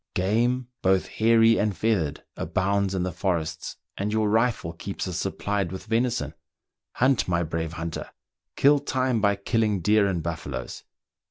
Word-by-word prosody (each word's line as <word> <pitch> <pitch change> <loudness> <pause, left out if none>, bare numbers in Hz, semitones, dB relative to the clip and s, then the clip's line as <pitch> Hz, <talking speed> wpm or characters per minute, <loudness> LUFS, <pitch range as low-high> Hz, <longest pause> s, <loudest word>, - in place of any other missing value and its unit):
^ - - -62
Game, 120 +6 +1
both 95 0 +3
hairy 115 0 +4
and 105 -2 0
feathered, 90 -10 0
abounds 100 +1 0
in 90 - 0
the 90 - -2
forests, 80 -2 -2 0.2
and 100 +2 -2
your 110 -1 +1
rifle 110 -7 +1
keeps 95 +3 -5
us 90 - -3
supplied 100 -4 -2
with 95 - -7
venison. 115 - 0 0.6
Hunt, 130 -1 +2
my 85 -1 +1
brave 80 0 -3
hunter! 85 -1 -5 0.5
kill 145 +1 +5
time 130 -4 0
by 100 -1 +3
killing 105 0 0
deer 105 +2 +3
and 90 -4 -1
buffaloes 85 -2 -5
100 Hz, 155 wpm, -26 LUFS, 85-115 Hz, 0.6 s, kill